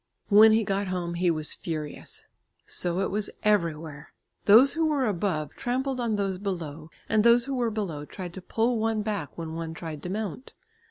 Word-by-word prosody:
When 215 +1 +8
he 225 0 +3
got 195 0 -1
home 180 -2 -2
he 175 +1 +1
was 155 -2 +1
furious. 155 -3 -5 0.4
So 175 +1 -1
it 195 - -1
was 210 +1 -1
everywhere. 160 -7 0 0.3
Those 230 +7 +7
who 325 -1 +1
were 290 -4 +1
above 175 - -1
trampled 260 +2 -2
on 230 -3 0
those 195 -2 -1
below, 165 -6 -5 0.2
and 215 -1 +3
those 235 +1 +6
who 275 - -3
were 245 -3 +1
below 185 -9 -4
tried 180 +2 -8
to 190 - -8
pull 230 +5 0
one 220 -1 0
back 205 -8 -4
when 165 -1 -5
one 165 0 -5
tried 160 -3 -6
to 180 - -6
mount. 215 +5 -5
195 Hz, 185 wpm, -27 LUFS, 165-225 Hz, 0.4 s, When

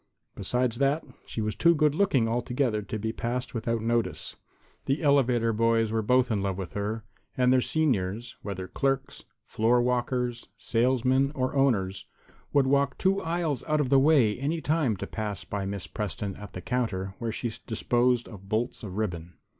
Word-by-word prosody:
Besides 125 +4 -1
that, 140 +3 +2 0.2
she 110 - -4
was 110 0 -1
too 170 0 +4
good 150 -1 +3
looking 150 - +2
altogether 120 -1 0
to 105 +2 -5
be 110 +1 -3
passed 125 +2 -3
without 115 -1 -1
notice. 115 0 -1 0.5
The 140 +5 0
elevator 125 -5 +3
boys 115 0 +2
were 110 0 +1
both 125 +3 +3
in 105 -3 +1
love 95 -1 -1
with 95 -3 -6
her, 105 +2 -3 0.3
and 125 0 +4
their 130 - +4
seniors 120 -7 0
whether 95 -2 -5
clerks, 135 +3 -2 0.2
floor 115 +3 +2
walkers, 125 0 -1
salesmen 130 +3 +2
or 130 -1 -1
owners 110 -9 +1 0.5
would 140 -2 +4
walk 140 0 +2
two 195 +1 +2
aisles 165 -5 -1
out 155 -1 +2
of 140 -4 +1
the 135 0 +6
way 135 -7 +4
any 150 +5 -1
time 150 -9 +1
to - - -4
pass 105 -3 -4
by 100 -1 -4
Miss 100 -2 -4
Preston 100 -1 -4
at 100 -2 -10
the 90 - -6
counter 95 -6 -2
where 115 -1 -2
she 115 +1 -3 0.2
disposed 120 +1 +1
of 100 -3 -12
bolts 115 +4 -1
of 100 -4 -7
ribbon. 85 -5 -3
120 Hz, 175 wpm, -27 LUFS, 105-135 Hz, 0.5 s, the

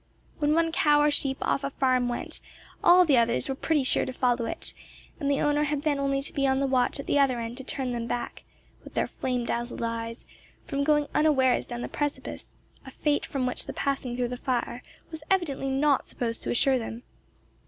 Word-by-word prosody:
When 300 0 +2
one 330 0 +2
cow 295 -2 +4
or 295 0 +4
sheep 270 -2 0
off 280 - 0
a 275 - -1
farm 255 -2 +1
went, 240 - -4 0.4
all 360 +1 +7
the 280 -7 +5
others 235 0 +1
were 270 - -1
pretty 295 +1 +1
sure 260 - +2
to - - -3
follow 245 -2 +1
it, - - -3 0.5
and 280 -3 -1
the 280 - +1
owner 295 0 +2
had 295 -1 -2
then 290 -2 +1
only 275 0 0
to - - -8
be 275 -1 +1
on 265 0 +2
the 275 - +1
watch 260 +1 +1
at 275 - -5
the 285 - +2
other 260 -3 +3
end 230 +1 -4
to 265 - -6
turn 260 -1 -3
them 235 -1 -3
back, 240 - -4 0.4
with - - -13
their - - +2
flame 250 -2 -2
dazzled 240 0 -3
eyes, 230 0 -4 0.4
from 280 0 -1
going 295 0 +3
unawares 270 -5 +3
down 240 0 -5
the - - -3
precipice, 290 -1 -4 0.3
a 265 - -10
fate 290 +2 0
from 270 -3 -2
which 250 - -2
the - - -4
passing 270 -3 -2
through 245 -1 0
the 250 - -4
fire 245 -1 -2 0.3
was 320 -1 -7
evidently 300 -8 0
not 275 +1 +2
supposed 230 -2 -3
to - - -4
ensure 260 +2 +3
them. 230 +1 -6
270 Hz, 215 wpm, -27 LUFS, 245-290 Hz, 0.5 s, all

